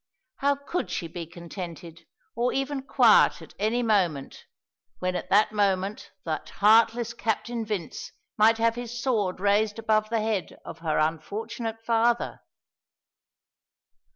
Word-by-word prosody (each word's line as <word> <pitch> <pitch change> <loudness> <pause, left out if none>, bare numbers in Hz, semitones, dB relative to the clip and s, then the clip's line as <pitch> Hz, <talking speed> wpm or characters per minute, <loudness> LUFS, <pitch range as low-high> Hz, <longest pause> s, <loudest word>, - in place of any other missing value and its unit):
How 280 0 +2
could 280 - -4
she 175 -1 -3
be 165 0 -7
contented 170 -1 -9 0.3
or 240 +2 +1
even 270 +1 -2
quiet 250 -4 +5
at - - -13
any 225 +4 +1
moment, 180 - 0 0.5
when 180 +5 -2
at - - -4
that 210 +2 +4
moment 200 -1 0 0.2
that 160 -2 -3
heartless 230 +2 +3
Captain 230 +1 -2
Vince 205 -7 -5 0.2
might 220 +1 +5
have 230 0 +2
his 240 0 -6
sword 215 -8 0
raised 205 +2 +2
above 215 -1 +1
the 225 -1 0
head 215 -4 -2
of 165 - -9
her 160 -2 -1
unfortunate 215 +8 -3
father? 235 +1 +1
215 Hz, 130 wpm, -26 LUFS, 185-230 Hz, 0.5 s, quiet